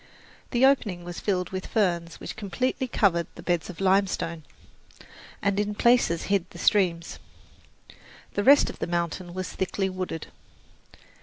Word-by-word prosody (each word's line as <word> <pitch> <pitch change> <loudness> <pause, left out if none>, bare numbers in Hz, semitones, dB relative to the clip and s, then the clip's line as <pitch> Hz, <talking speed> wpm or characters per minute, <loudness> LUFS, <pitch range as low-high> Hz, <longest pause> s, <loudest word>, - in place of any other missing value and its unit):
The 250 +1 +3
opening 210 -10 +2
was 175 0 -6
filled 180 -3 -1
with 185 0 -4
ferns 170 -6 0
which - - -7
completely 255 +6 -2
covered 180 -8 +2
the - - -10
beds 175 -2 -1
of 180 - -9
limestone 190 -4 +1 1.0
and 200 0 +1
in 210 0 -1
places 235 -8 +3
hid 195 -3 0
the - - -12
streams. 175 -3 +1 1.1
The 205 - 0
rest 280 +4 +7
of - - -16
the - - -2
mountain 175 +1 -2
was 185 -1 -4
thickly 190 0 -1
wooded. 185 -4 -4
185 Hz, 145 wpm, -26 LUFS, 175-205 Hz, 1.1 s, rest